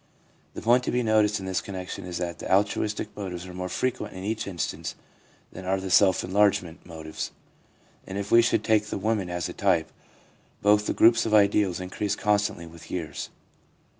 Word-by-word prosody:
The -, -, -7 dB
point 120 Hz, +2 st, +4 dB
to -, -, 0 dB
be 125 Hz, 0 st, +1 dB
noticed 105 Hz, -2 st, +3 dB
in 95 Hz, -, -7 dB
this 95 Hz, -1 st, -1 dB
connection 95 Hz, 0 st, -6 dB
is 90 Hz, -1 st, -4 dB
that 85 Hz, -1 st, -4 dB
the -, -, -5 dB
altruistic 105 Hz, +2 st, +1 dB
motives 90 Hz, -3 st, -5 dB
are 90 Hz, -, -9 dB
more 90 Hz, 0 st, -4 dB
frequent 125 Hz, -4 st, -2 dB
in 95 Hz, -, -7 dB
each 110 Hz, +1 st, -2 dB
instance 85 Hz, -5 st, -4 dB, 0.6 s
than 95 Hz, -, -8 dB
are 95 Hz, +1 st, 0 dB
the 95 Hz, -1 st, -5 dB
self 95 Hz, 0 st, +5 dB
enlargement 95 Hz, -3 st, +1 dB
motives, 80 Hz, -2 st, -6 dB, 0.8 s
and 95 Hz, -, -5 dB
if 100 Hz, +1 st, -4 dB
we 115 Hz, -, +8 dB
should 115 Hz, -, +1 dB
take 105 Hz, -1 st, +2 dB
the -, -, -3 dB
women 100 Hz, -2 st, -1 dB
as 90 Hz, -2 st, -2 dB
a -, -, -7 dB
type, 80 Hz, -2 st, +1 dB, 0.7 s
both 105 Hz, +1 st, +4 dB
the -, -, +1 dB
groups 115 Hz, 0 st, +5 dB
of 110 Hz, -, +3 dB
ideals 100 Hz, -3 st, +3 dB
increase 95 Hz, +2 st, -2 dB
constantly 105 Hz, -4 st, 0 dB
with 85 Hz, +1 st, -13 dB
years. 85 Hz, -4 st, -4 dB
100 Hz, 190 wpm, -26 LUFS, 90-105 Hz, 0.8 s, we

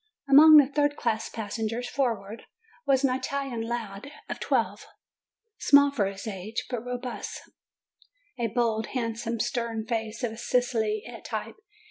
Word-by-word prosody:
Among 305 Hz, +3 st, +9 dB
the 290 Hz, -, +8 dB
third 290 Hz, +1 st, +1 dB
class 225 Hz, -4 st, -1 dB
passengers 225 Hz, +2 st, -3 dB
forward, 230 Hz, -6 st, -2 dB, 0.4 s
was 270 Hz, -1 st, +3 dB
an 265 Hz, -2 st, +3 dB
Italian 265 Hz, -2 st, -3 dB
lad 225 Hz, +1 st, -5 dB, 0.2 s
of -, -, -4 dB
twelve, -, -, -1 dB, 0.7 s
small 285 Hz, 0 st, +6 dB
for 215 Hz, -8 st, 0 dB
his 195 Hz, +2 st, -7 dB
age, 215 Hz, +2 st, -4 dB
but 240 Hz, -2 st, -3 dB
robust; 250 Hz, 0 st, -5 dB, 1.0 s
a 235 Hz, -, +1 dB
bold, 225 Hz, -1 st, 0 dB
handsome, 230 Hz, -1 st, -2 dB
stern 230 Hz, -1 st, -2 dB
face, 225 Hz, 0 st, -3 dB
of 225 Hz, -1 st, -3 dB
Sicilian 230 Hz, -2 st, -1 dB
type. 220 Hz, -, -5 dB
235 Hz, 130 wpm, -27 LUFS, 220-255 Hz, 1.0 s, Among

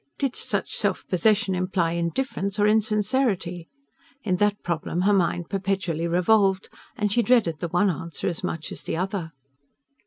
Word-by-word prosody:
Did 275 Hz, -3 st, -1 dB
such -, -, -2 dB
self -, -, -1 dB
possession 205 Hz, +2 st, +2 dB
imply 180 Hz, -2 st, 0 dB
indifference 195 Hz, +4 st, -2 dB
or 205 Hz, -, +3 dB
insincerity? 210 Hz, -4 st, +1 dB, 0.6 s
In 185 Hz, -4 st, 0 dB
that 205 Hz, +1 st, +1 dB
problem 170 Hz, +1 st, -2 dB
her 205 Hz, +3 st, +3 dB
mind 175 Hz, -3 st, +1 dB
perpetually 190 Hz, -4 st, -1 dB
revolved; 190 Hz, +2 st, +2 dB, 0.3 s
and 210 Hz, -1 st, -1 dB
she 240 Hz, -, +3 dB
dreaded 225 Hz, -11 st, +2 dB
the 175 Hz, -, -2 dB
one 180 Hz, +4 st, +2 dB
answer 170 Hz, 0 st, -6 dB
as 175 Hz, -, -2 dB
much 160 Hz, -1 st, -4 dB
as -, -, -6 dB
the -, -, -3 dB
other. 185 Hz, -2 st, -3 dB
190 Hz, 155 wpm, -25 LUFS, 170-210 Hz, 0.6 s, or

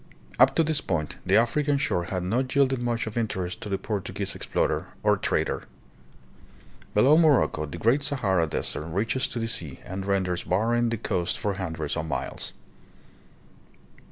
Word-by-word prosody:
Up -, -, +6 dB
to 165 Hz, -, +4 dB
this 155 Hz, -2 st, +1 dB
point 75 Hz, -5 st, -2 dB
the -, -, +4 dB
Afri 120 Hz, +6 st, +3 dB
can 145 Hz, -1 st, +2 dB
shore 90 Hz, -10 st, 0 dB
had 90 Hz, 0 st, -3 dB
not 125 Hz, +9 st, -1 dB
yielded 135 Hz, -2 st, +3 dB
much 120 Hz, -1 st, -1 dB
of 110 Hz, +1 st, -3 dB
interest 105 Hz, -2 st, -3 dB
to 105 Hz, -, -5 dB
the 100 Hz, -, 0 dB
Portu 105 Hz, -2 st, -4 dB
guese -, -, -2 dB
explorer -, -, -1 dB, 0.2 s
or -, -, +4 dB
trader. -, -, -1 dB, 1.3 s
Below 140 Hz, +9 st, +6 dB
Morocco 140 Hz, -, +3 dB
the 80 Hz, -, -7 dB
great 115 Hz, -, +3 dB
Sahara 100 Hz, -, +1 dB
Desert 75 Hz, 0 st, -2 dB
reaches 110 Hz, +10 st, 0 dB
to -, -, -6 dB
the 115 Hz, -1 st, -1 dB
sea 80 Hz, -11 st, -3 dB
and 95 Hz, +1 st, -5 dB
renders 95 Hz, -2 st, 0 dB
barren 115 Hz, +5 st, +1 dB
the 115 Hz, -, -1 dB
coast 95 Hz, -5 st, -1 dB
for 105 Hz, -3 st, -1 dB
hundreds 80 Hz, -6 st, -3 dB
of 80 Hz, -, -3 dB
miles. 75 Hz, -, -3 dB
105 Hz, 170 wpm, -26 LUFS, 90-120 Hz, 1.3 s, Up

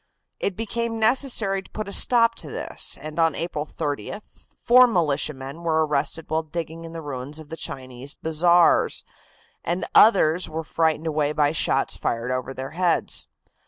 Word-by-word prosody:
It 200 Hz, -, -1 dB
became 230 Hz, +1 st, -3 dB
necessary 220 Hz, -4 st, +1 dB
to -, -, -19 dB
put 215 Hz, -2 st, -6 dB
a -, -, -6 dB
stop 230 Hz, -2 st, +5 dB
to -, -, -8 dB
this, -, -, -2 dB
and 155 Hz, +1 st, -7 dB
on 165 Hz, -2 st, +3 dB
April 155 Hz, -3 st, -3 dB
30th 150 Hz, +8 st, -4 dB, 0.3 s
four 250 Hz, +1 st, +6 dB
militiamen 150 Hz, -, -1 dB
were 160 Hz, -2 st, +1 dB
arrested 150 Hz, +2 st, -2 dB
while 160 Hz, +1 st, 0 dB
digging 165 Hz, +1 st, -6 dB
in 165 Hz, -, -9 dB
the 165 Hz, -1 st, -7 dB
ruins 140 Hz, +1 st, -6 dB
of 155 Hz, -2 st, -11 dB
the 160 Hz, -, -6 dB
Chinese 130 Hz, -2 st, -7 dB
bazaars, 170 Hz, +2 st, +3 dB, 0.6 s
and 175 Hz, +2 st, -2 dB
others 180 Hz, -5 st, +5 dB
were 160 Hz, +1 st, -4 dB
frightened 160 Hz, 0 st, 0 dB
away 150 Hz, -2 st, 0 dB
by 145 Hz, -1 st, +2 dB
shots 160 Hz, -, 0 dB
fired 115 Hz, +2 st, -2 dB
over 130 Hz, +1 st, -3 dB
their 135 Hz, 0 st, -6 dB
heads. 175 Hz, +1 st, 0 dB
160 Hz, 160 wpm, -23 LUFS, 150-185 Hz, 0.6 s, four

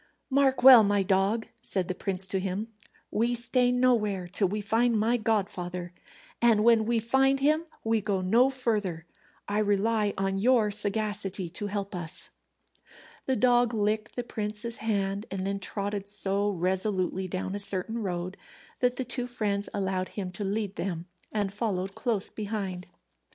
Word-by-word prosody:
"Mark 265 Hz, -2 st, +2 dB
well, 255 Hz, -3 st, +11 dB
my 205 Hz, -1 st, +2 dB
dog," 195 Hz, +4 st, +1 dB, 0.2 s
said 185 Hz, -3 st, 0 dB
the 185 Hz, -, -2 dB
prince 190 Hz, 0 st, 0 dB
to 190 Hz, 0 st, -1 dB
him, 195 Hz, +4 st, -3 dB, 0.4 s
"we 235 Hz, +3 st, +1 dB
stay 245 Hz, +1 st, +2 dB
nowhere 220 Hz, -7 st, +1 dB
till 195 Hz, +2 st, +1 dB
we 210 Hz, +4 st, -3 dB
find 225 Hz, +3 st, +1 dB
my 225 Hz, +3 st, +2 dB
godfather, 185 Hz, -6 st, -2 dB, 0.5 s
and 230 Hz, -3 st, +4 dB
when 225 Hz, -1 st, +4 dB
we 235 Hz, 0 st, +2 dB
find 265 Hz, +4 st, +2 dB
him 305 Hz, +4 st, +2 dB, 0.2 s
we 225 Hz, -1 st, +1 dB
go 200 Hz, -2 st, -1 dB
no 230 Hz, +8 st, +3 dB
further. 210 Hz, -10 st, -2 dB, 0.4 s
I 205 Hz, +1 st, 0 dB
rely 210 Hz, 0 st, +1 dB
on 195 Hz, 0 st, -1 dB
your 225 Hz, -1 st, +3 dB
sagacity 205 Hz, -3 st, -2 dB
to 205 Hz, +4 st, -4 dB
help 200 Hz, 0 st, -4 dB
us." 175 Hz, -1 st, -4 dB, 1.0 s
The 265 Hz, -, +2 dB
dog 245 Hz, -1 st, +3 dB
licked 215 Hz, 0 st, -1 dB
the 245 Hz, -, -3 dB
prince's 215 Hz, +1 st, -3 dB
hand, 200 Hz, -1 st, -2 dB
and 190 Hz, 0 st, -4 dB
then 200 Hz, 0 st, -2 dB
trotted 200 Hz, 0 st, -3 dB
so 200 Hz, 0 st, +1 dB
resolutely 185 Hz, 0 st, -1 dB
down 185 Hz, +1 st, -4 dB
a 205 Hz, -, -3 dB
certain 200 Hz, +3 st, +4 dB
road 180 Hz, -2 st, -4 dB, 0.4 s
that 250 Hz, 0 st, +1 dB
the 260 Hz, -, -3 dB
two 245 Hz, 0 st, -2 dB
friends 205 Hz, -4 st, -2 dB
allowed 190 Hz, -2 st, -2 dB
him 190 Hz, -3 st, -3 dB
to 195 Hz, +3 st, -4 dB
lead 200 Hz, 0 st, -3 dB
them 175 Hz, -3 st, -3 dB, 0.3 s
and 205 Hz, -2 st, -2 dB
followed 195 Hz, -3 st, -2 dB
close 220 Hz, -4 st, +1 dB
behind. 200 Hz, -4 st, -4 dB
205 Hz, 160 wpm, -28 LUFS, 195-230 Hz, 1.0 s, well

